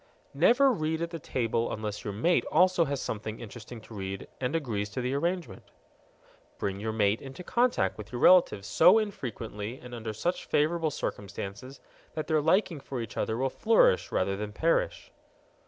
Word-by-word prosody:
Never 240 - +5
read 160 -5 -1
at 170 - -4
the 165 - -5
table 115 -4 -1
unless 105 -1 -4
your 105 - -3
mate 145 - +2
also 180 -2 +4
has 140 -2 -2
something 110 -1 -4
interesting 115 +1 -9
to 110 - -14
read 95 -1 -5
and 125 +4 -1
agrees 110 -10 -2
to 110 - -5
the 125 +2 -1
arrangement. 170 +4 -2 1.0
Bring 100 0 -3
your 110 +2 -2
mate 105 -1 +1
into 135 +6 -9
contact 235 - +1
with 105 - -9
your 120 - -4
relatives 175 - +5
so 175 - +6
infrequently 120 - -4
and 125 -1 -11
under 115 -2 -4
such 175 - -2
favorable 160 +2 +1
circumstances 100 +1 -6 0.3
that 155 - -2
their 155 -2 +2
liking 165 0 +2
for 135 -1 -6
each 115 -2 -6
other 110 - -1
will 130 +1 0
flourish 220 - +3
rather 95 +1 0
than 105 +1 -5
perish. 165 +9 0
125 Hz, 170 wpm, -29 LUFS, 105-165 Hz, 1.0 s, so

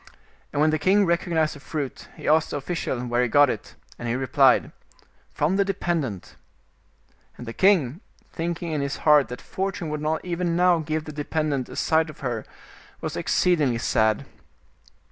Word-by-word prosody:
And 145 - -2
when 155 +1 +4
the 155 - 0
king 195 +6 +4
recognized 170 -2 +1
the 145 - -11
fruit, 145 -2 -5
he - - -7
asked 155 +1 +3
the - - -3
official 145 -3 -3
where 120 0 +1
he 125 - +1
got 145 +2 +5
it, 105 - -8 0.2
and 120 - -5
he 115 - 0
replied, 130 0 +3 0.3
" - - -35
From 165 +6 +1
the 200 - +4
dependent." 165 - -3 1.0
And 120 - -8
the 115 - -6
king, 175 - +3 0.3
thinking 170 0 -3
in 150 -2 -1
his 140 0 -2
heart 150 -2 +6
that 125 - -7
Fortune 190 -4 -4
would 150 0 -3
not 155 +2 -1
even 175 -1 -1
now 180 -1 +4
give 155 0 -3
the 155 - -7
dependent 150 -3 -2
a - - -9
sight 160 0 +2
of 155 - -12
her, 120 -5 -3 0.5
was - - -4
exceedingly 150 -9 +2
sad. 110 -2 +1
155 Hz, 180 wpm, -24 LUFS, 135-170 Hz, 1.0 s, heart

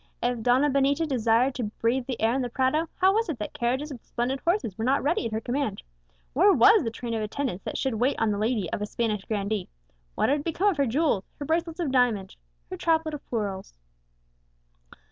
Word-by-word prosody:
If 245 -1 0
Donna 250 +5 +3
Benita 280 +3 +2
desired 245 -1 +2
to 250 -4 -3
breathe 235 +4 -1
the 255 -3 -4
air 225 +1 +2
in 265 - 0
the 245 - -2
Prado, 270 +6 0
how 380 +1 +4
was 445 -1 0
it 305 - -2
that 210 - -5
carriages 270 +2 -1
with 240 - -11
splendid 250 +3 -2
horses 340 - 0
were 220 - -4
not 265 +3 +2
ready 290 -4 +1
at - - -7
her 220 - -1
command? 245 -2 -2 0.5
Where 380 +8 +5
was 405 +1 +6
the 230 - -1
train 230 +1 -5
of 225 - -1
attendants 215 -3 -3
that - - -3
should 265 -2 -1
wait 245 +5 0
on 225 -1 +2
the 205 - -2
lady 215 -4 0
of - - -2
a 210 - -2
Spanish 215 -3 -2
grandee? 205 -2 -2 0.5
What - - +1
had 285 +1 +1
become 345 +5 +1
of 370 - -2
her 280 -2 +2
jewels, 260 - +1
her 290 - -5
bracelets 330 +2 -1
of 320 -6 -1
diamonds, 235 -7 +1 0.4
her 370 - -4
chaplet 320 -2 +1
of 295 - -6
pearls? 200 -5 -4
255 Hz, 220 wpm, -26 LUFS, 225-295 Hz, 0.5 s, was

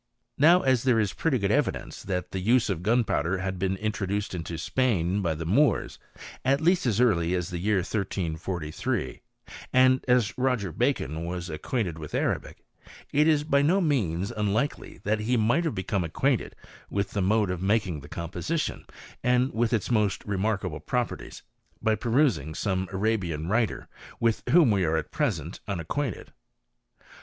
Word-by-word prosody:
Now 170 +5 +6
as 130 -3 +3
there 125 -3 +3
is 105 -3 0
pretty 160 -5 +1
good 100 -2 0
evidence 145 +2 -1
that 90 -2 -3
the 95 - -3
use 110 +3 +3
of 85 -4 -3
gunpowder 100 -5 +1
had 95 0 -3
been 95 +1 0
introduced 105 -1 -2
into 85 -1 -4
Spain 100 -2 0
by 85 -4 0
the 80 +1 -5
Moors, 135 - +2 0.4
at 135 +2 +3
least 175 -1 +2
as 110 -2 +1
early 90 -8 +3
as 90 0 -3
the 90 - -3
year 105 +4 +1
1343, 85 -5 -3 0.5
and 130 0 +4
as 125 -4 +3
Roger 125 -8 0
Bacon 80 +1 -1
was 85 0 -4
acquainted 85 +1 -2
with 75 -2 -6
Arabic, - - -2 0.5
it 150 +2 +4
is 150 -2 +3
by 140 -2 +2
no 170 +7 +3
means 100 - 0
unlikely 110 +7 -2
that 105 +1 +1
he 120 +4 +1
might 120 +10 +2
have 160 - -1
become 95 0 -1
ac 80 - -6
quainted 135 -3 +1 0.4
with 100 -1 -2
the 100 - -1
mode 105 0 +2
of 90 -1 -4
making 100 -5 +1
the 70 +1 -12
composition, 95 - -3 0.4
and 125 +1 +2
with 115 +1 +1
its 115 -1 0
most 105 -4 +1
remarkable 100 -5 -1
properties, 120 +10 -3 0.4
by 110 - +2
perusing 115 - +1
some 95 -1 -1
Arabian 95 -6 -1
writer, 110 +3 0 0.3
with 115 -1 +1
whom 160 -8 +6
we 100 -2 +2
are 80 -1 +1
at - - -4
present 95 - -2
unacquainted. 100 - -3
105 Hz, 165 wpm, -27 LUFS, 90-125 Hz, 0.5 s, Now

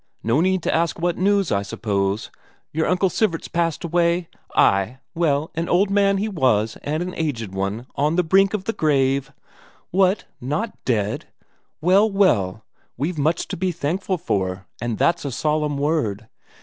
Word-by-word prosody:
No 115 +7 +2
need 185 -1 +1
to - - 0
ask 165 -1 +1
what 175 0 0
news, 200 -1 +2
I 100 - +2
suppose? 100 0 -2 0.4
Your 160 +1 0
Uncle 180 +1 +2
Sivert's 185 -3 0
passed 170 -2 -1
away? 170 0 +1 0.3
Ay, 100 +6 +3 0.2
well, 155 -3 0
an 165 +1 -3
old 195 +3 +3
man 200 -1 +3
he 205 +3 -1
was 125 - +1
and 155 +4 -2
an 180 0 -5
aged 120 - -3
one, 100 +5 -3
on 150 +3 +1
the 180 - +3
brink 195 +4 +4
of 200 - -4
the 225 - -2
grave. 135 -4 +1 0.6
What 190 +2 +2 0.2
not 150 - -2
dead? 105 -4 -1 0.5
Well, 190 +6 +4
well, 110 - +2 0.3
we've 155 +5 -2
much 160 +4 +1
to - - -4
be 185 +1 0
thankful 180 +5 -2
for, 95 - -2 0.2
and 120 -2 -2
that's 170 0 +2
a 140 - -3
solemn 150 +2 0
word! 140 -8 -1
160 Hz, 165 wpm, -22 LUFS, 120-180 Hz, 0.6 s, brink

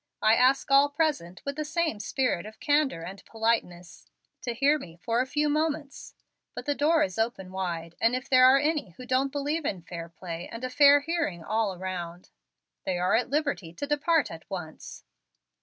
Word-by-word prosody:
I 220 - +6
ask 260 +3 +3
all 280 +1 +6
present, 285 - -2
with 280 +1 -4
the 305 - -1
same 315 -6 -1
spirit 215 -3 -1
of 220 - -13
candor 290 - +1
and 190 +3 -9
politeness, 220 -6 -2 0.3
to 240 -3 -3
hear 285 +5 +3
me 165 -10 -11
for 230 +7 0
a 260 - -2
few 295 +2 0
moments. 300 -1 -2 0.4
But - - -6
the 290 - +1
door 310 +3 +3
is 185 +2 -3
open 220 -5 -2
wide, 170 -3 -4
and 230 +2 +3
if 255 +2 -4
there 255 -1 +6
are 265 +1 +7
any 290 - -1
who 255 - -9
don't 260 +2 +1
believe 290 +3 -2
in 190 -10 -3
fair 170 -1 -7
play 170 0 -7
and 230 +2 -7
a 255 - -3
fair 285 +2 +6
hearing 290 - -2
all 215 0 0
around, 180 -1 -6 0.5
they 185 -1 -1
are 180 +1 +1
at 245 +3 +1
liberty 280 - -1
to 230 - -4
depart 295 +1 +1
at 165 +3 -11
once." 175 -5 -8
250 Hz, 190 wpm, -27 LUFS, 185-290 Hz, 0.5 s, are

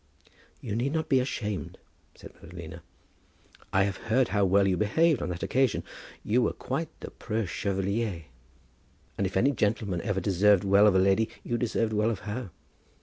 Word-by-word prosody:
"You 100 - -4
need 130 +5 -1
not 160 -1 -2
be 135 - +4
ashamed," 105 -6 -3 0.4
said - - -13
Madalina. - - -10 0.9
"I 95 - +3
have 100 0 -2
heard 120 +3 +1
how 100 -1 +2
well 95 +1 +3
you 95 - +2
behaved 145 - +2
on - - -3
that 90 -1 -5
occasion. 130 -4 +1 0.4
You 120 +4 +2
were 120 - +1
quite 155 +5 -3
the - - -7
preux 110 -1 -3
chevalier; 100 0 -2 0.9
and 100 - 0
if 95 - -3
any 135 +8 +3
gentleman 105 -6 -1
ever 100 +1 -1
deserved 100 0 +3
well 100 +2 +5
of 100 - +4
a - - +6
lady 95 +4 +3
you 120 - -2
deserved 115 -2 -1
well 105 +1 +2
of 110 -4 -3
her. 110 +1 -5
105 Hz, 175 wpm, -28 LUFS, 95-120 Hz, 0.9 s, a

